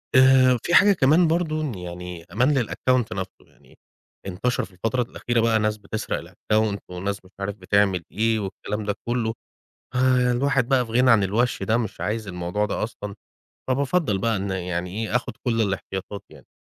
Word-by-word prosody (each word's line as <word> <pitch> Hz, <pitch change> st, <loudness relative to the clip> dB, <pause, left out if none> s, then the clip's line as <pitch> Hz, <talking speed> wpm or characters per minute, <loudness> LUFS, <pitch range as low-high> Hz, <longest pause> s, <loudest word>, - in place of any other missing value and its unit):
آآ، 130 Hz, -1 st, +6 dB
في 175 Hz, -, -1 dB
حاجة 205 Hz, 0 st, +7 dB
كمان 160 Hz, +2 st, +4 dB
برضو 160 Hz, -1 st, 0 dB
إن 150 Hz, -5 st, -2 dB
يعني 90 Hz, -1 st, -7 dB
أمان 125 Hz, +4 st, +2 dB
للAccount 130 Hz, +1 st, +1 dB
نفْسه، 95 Hz, 0 st, -3 dB, 0.2 s
يعني -, -, -23 dB, 0.5 s
انتشر 105 Hz, +7 st, -1 dB
في 95 Hz, -, -19 dB
الفترة 115 Hz, +7 st, -1 dB
الأخيرة 120 Hz, 0 st, -2 dB
بقى 115 Hz, -1 st, +3 dB
ناس 105 Hz, 0 st, 0 dB
بتسرق 105 Hz, +1 st, -4 dB
الAccount 105 Hz, -1 st, 0 dB
وناس 95 Hz, +2 st, -4 dB
مش 95 Hz, -, -18 dB
عارف 100 Hz, 0 st, -3 dB
بتعمل 100 Hz, -2 st, +1 dB
إيه 110 Hz, +1 st, +1 dB
والكلام 105 Hz, +1 st, -4 dB
ده 100 Hz, -1 st, -1 dB
كله، 120 Hz, -2 st, 0 dB, 0.6 s
آآ، 125 Hz, -1 st, +3 dB
الواحد 135 Hz, 0 st, +1 dB
بقى 130 Hz, -2 st, +3 dB
في 115 Hz, -, -10 dB
غنى 125 Hz, +2 st, +4 dB
عن 110 Hz, -3 st, +5 dB
الوَش 110 Hz, +3 st, 0 dB
ده، 110 Hz, +4 st, +2 dB
مش 115 Hz, -4 st, -4 dB
عايز 110 Hz, 0 st, -2 dB
الموضوع 90 Hz, +3 st, -2 dB
ده -, -, -2 dB
أصلًا، 105 Hz, -2 st, -6 dB, 0.5 s
فبافضّل 135 Hz, -, +1 dB
بقى 115 Hz, +2 st, +1 dB
إن 100 Hz, +1 st, -3 dB
يعني 90 Hz, -1 st, -3 dB
إيه، 110 Hz, +2 st, 0 dB
آخد 125 Hz, -, -3 dB
كل 115 Hz, -2 st, +1 dB
الاحتياطات 95 Hz, 0 st, -4 dB
يعني. -, -, -16 dB
110 Hz, 175 wpm, -24 LUFS, 100-125 Hz, 0.6 s, حاجة